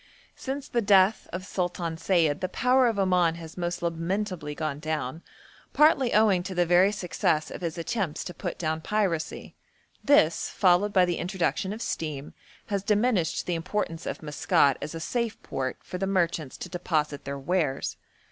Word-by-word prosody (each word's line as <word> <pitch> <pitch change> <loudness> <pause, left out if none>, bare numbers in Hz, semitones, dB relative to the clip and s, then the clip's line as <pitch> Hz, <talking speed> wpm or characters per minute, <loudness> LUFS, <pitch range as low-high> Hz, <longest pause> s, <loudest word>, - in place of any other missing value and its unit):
Since 270 +1 -5
the 235 - 0
death 200 0 +4
of 185 +2 -5
Sultan 175 -3 -2
Sayid 160 -4 +1
the 185 - -1
power 255 +4 +3
of 225 -3 0
Oman 180 -4 +3
has 165 -1 -10
most 175 0 -3
lamentably 170 -2 -2
gone 155 -2 -3
down, 155 -1 -3 0.5
partly 285 -5 +4
owing 210 -4 +4
to 185 +1 -6
the 175 0 +3
very 180 +3 +5
success 180 -5 -1
of - - -7
his 170 -1 -3
attempts 180 -2 -2
to 180 - -7
put 180 -2 -5
down 160 -1 -2
piracy; 180 -5 -2 0.5
this, 170 - +4
followed 190 +1 +3
by 185 -2 +5
the 175 -1 -1
introduction 190 +1 -1
of 215 +2 -5
steam, 150 -3 -4 0.3
has 200 -2 -1
diminished 205 -4 +1
the 180 - -1
importance 170 0 -3
of - - -5
Maskat 145 -2 +2
as 155 +3 -5
a - - -4
safe 235 +6 -2
port 130 -1 -3
for 180 - -6
the 195 - -1
merchants 170 -7 0
to - - -6
deposit 155 -5 -2
their 140 0 -4
wares. 140 -1 -1
175 Hz, 170 wpm, -27 LUFS, 160-200 Hz, 0.5 s, very